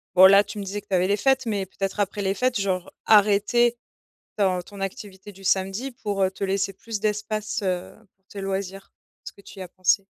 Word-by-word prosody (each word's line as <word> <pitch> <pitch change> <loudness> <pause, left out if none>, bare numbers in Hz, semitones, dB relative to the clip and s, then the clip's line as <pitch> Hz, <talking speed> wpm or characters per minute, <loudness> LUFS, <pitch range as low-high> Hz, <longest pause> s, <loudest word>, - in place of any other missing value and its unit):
Bon, 185 +1 +9
là, 200 +1 +8
tu 205 +1 -9
me 205 - -4
disais 200 +2 -5
que 205 - -33
tu 190 - 0
avais 180 0 +2
les 200 +1 +2
fêtes 265 +3 +2
mais 205 -4 -1
peut-être 195 +2 -4
après 205 +1 -1
les 190 - +1
fêtes, 250 +1 0
genre, 185 -2 -2
arrêter 215 +3 +4 0.6
ton 190 -3 +1
ton 200 +2 -12
activité 195 +1 -7
du 195 0 -16
samedi 195 +7 0
pour, 205 -5 -3
heu, 185 - +3
te 195 - -5
laisser 195 0 0
plus 220 +1 -6
d'espace, 215 +1 -2
heu, 180 -2 -2 0.2
pour 190 0 -48
tes 200 - -8
loisirs? 195 0 -4 0.3
Est-ce - - -8
que - - -19
tu 200 - -14
y - - -4
as 180 - -8
pensé? 185 +2 +1
200 Hz, 225 wpm, -24 LUFS, 190-210 Hz, 0.6 s, Bon